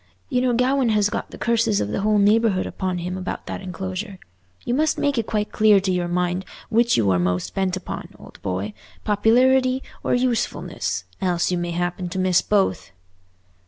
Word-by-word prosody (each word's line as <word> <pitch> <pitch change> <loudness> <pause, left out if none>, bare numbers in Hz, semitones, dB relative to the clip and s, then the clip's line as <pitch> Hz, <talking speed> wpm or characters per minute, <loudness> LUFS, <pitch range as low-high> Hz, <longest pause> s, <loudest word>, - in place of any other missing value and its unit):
You 250 - +1
know 250 -1 +2
Gawaine 255 0 +2
has 210 -1 +2
got - - -3
the - - -10
curses 230 -2 +1
of 100 - -1
the 105 - -2
whole 210 +1 +2
neighbourhood 205 -1 +3
upon 185 -2 -3
him 180 +1 -4
about 185 - -5
that - - -5
enclosure. 190 +2 -5 0.5
You 240 - 0
must 310 +4 +1
make 285 -4 +1
it 225 - -3
quite 210 -1 -1
clear 215 -2 +5
to 190 0 -1
your 180 -1 0
mind 180 +1 -1 0.3
which 235 +1 +3
you 105 -4 +3
are 90 - +2
most 90 0 -1
bent 190 -1 0
upon, 185 - -6
old - - -15
boy—popularity 225 - +1 0.2
or - - +1
usefulness—else 220 -7 -1
you 180 - 0
may 175 0 -2
happen 175 +1 -2
to 180 - -5
miss 185 -1 +3
both." 190 - 0
195 Hz, 180 wpm, -22 LUFS, 180-230 Hz, 0.5 s, clear